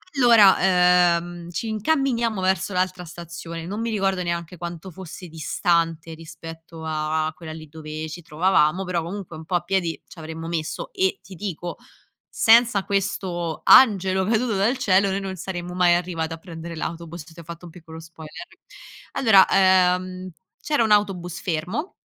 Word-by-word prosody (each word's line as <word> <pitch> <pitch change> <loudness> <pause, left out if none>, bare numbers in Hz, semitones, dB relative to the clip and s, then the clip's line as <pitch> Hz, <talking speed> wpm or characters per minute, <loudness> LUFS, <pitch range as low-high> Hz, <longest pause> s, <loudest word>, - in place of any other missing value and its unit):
Allora, 185 -7 +5
ehm, 175 0 -8
ci 180 +6 -4
incamminiamo 235 -1 0
verso 190 +1 0
l'altra 185 0 -1
stazione, 170 0 -8
non 205 +5 -4
mi 230 - -2
ricordo 195 -4 0
neanche 170 0 -4
quanto 175 +2 -7
fosse 180 +1 -10
distante, 165 0 -1
rispetto 165 0 -11
a 155 0 -1
quella 160 -1 -9
lì 155 0 -10
dove 155 0 -7
ci 175 +3 -8
trovavamo, 165 +1 +2
però 180 -2 -1
comunque 180 0 -7
un 160 - -10
po' 180 - -2
a 175 - +2
piedi 175 -2 -1
c'avremmo 160 0 -8
messo 165 -2 -4
e 190 0 0
ti 190 - -12
dico 175 -2 -5 0.6
senza 230 -3 +5
questo 185 -4 -2
angelo 190 -6 +6
caduto 225 +1 +1
dal 205 +7 +2
cielo 195 -3 +3
noi 195 - -1
non 190 -1 -5
saremmo 175 0 -6
mai 180 -1 +4
arrivate 170 -2 -3
a - - -13
prendere 165 0 -9
l'autobus, 170 0 -6
ti 165 +1 -15
ho - - -10
fatto 170 +2 -10
un 170 - -11
piccolo 160 -1 -12
spoiler. 160 -1 -11 0.7
Allora, 210 -7 +6 0.5
uhm, 185 0 -8 0.3
c'era 295 -6 +1
un 220 - 0
autobus 190 -5 +1
fermo 185 - -3
175 Hz, 160 wpm, -23 LUFS, 165-195 Hz, 0.7 s, angelo